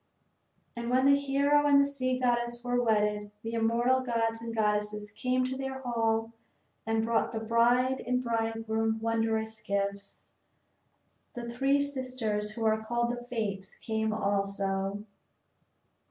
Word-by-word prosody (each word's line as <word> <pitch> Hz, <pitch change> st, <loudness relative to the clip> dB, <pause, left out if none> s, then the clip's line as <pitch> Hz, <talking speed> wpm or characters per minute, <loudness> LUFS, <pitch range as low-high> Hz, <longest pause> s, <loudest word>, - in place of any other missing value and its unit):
And 235 Hz, 0 st, -4 dB
when 255 Hz, +2 st, +3 dB
the 280 Hz, 0 st, +7 dB
hero 280 Hz, +1 st, +2 dB
and 285 Hz, -1 st, +6 dB
the 280 Hz, -, +5 dB
sea 255 Hz, -2 st, -1 dB
goddess 240 Hz, -1 st, 0 dB
were 245 Hz, 0 st, +1 dB
wedded 210 Hz, -2 st, +1 dB
the 225 Hz, +1 st, -4 dB
immortal 235 Hz, +3 st, +2 dB
gods 230 Hz, -2 st, -1 dB
and 230 Hz, 0 st, -5 dB
goddesses 210 Hz, -1 st, -1 dB
came 255 Hz, +4 st, 0 dB
to 255 Hz, +1 st, -2 dB
their 265 Hz, 0 st, -4 dB
hall 225 Hz, -2 st, 0 dB, 0.5 s
and 225 Hz, 0 st, +1 dB
brought 230 Hz, 0 st, +1 dB
the 225 Hz, -, -3 dB
bride 240 Hz, +3 st, +3 dB
and 250 Hz, 0 st, +2 dB
the 250 Hz, -, -2 dB
bridegroom 225 Hz, -1 st, 0 dB
wondrous 220 Hz, -1 st, -1 dB
gifts. 200 Hz, 0 st, -3 dB, 1.0 s
The 240 Hz, -1 st, -5 dB
three 270 Hz, +4 st, +2 dB
sisters 255 Hz, -7 st, -2 dB
who 225 Hz, +1 st, -4 dB
are 220 Hz, 0 st, +2 dB
called 240 Hz, +1 st, 0 dB
the 245 Hz, 0 st, -5 dB
Fates 215 Hz, -6 st, -4 dB
came 220 Hz, -1 st, -2 dB
also. 200 Hz, -1 st, -1 dB
230 Hz, 140 wpm, -30 LUFS, 220-250 Hz, 1.0 s, the